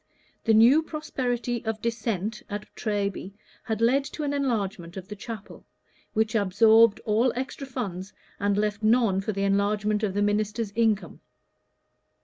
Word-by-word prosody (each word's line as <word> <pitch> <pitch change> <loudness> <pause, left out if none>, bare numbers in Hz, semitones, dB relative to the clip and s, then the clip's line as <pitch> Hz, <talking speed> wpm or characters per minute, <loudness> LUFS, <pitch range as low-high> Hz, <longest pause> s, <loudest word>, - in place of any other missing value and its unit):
The 225 -2 +4
new 240 +8 +7
prosperity 245 -7 -3
of 220 -1 -3
Dissent 220 -2 -2
at 205 0 -5
Treby 200 -3 -2 0.3
had 220 0 -2
led 260 +4 +3
to 305 - -6
an 285 -1 -1
enlargement 200 -10 -2
of 190 -1 -7
the 210 - -6
chapel, 215 0 -9 0.5
which 220 0 +1
absorbed 220 +2 +5
all 230 +4 +2
extra 265 +2 -5
funds 200 -7 -5 0.3
and 205 -1 +1
left 210 0 -1
none 215 -3 +3
for 205 - -2
the 195 -1 -2
enlargement 205 +1 +1
of 200 -3 -1
the 205 - +2
minister's 210 +1 0
income. 220 -1 0
215 Hz, 145 wpm, -26 LUFS, 205-235 Hz, 0.5 s, new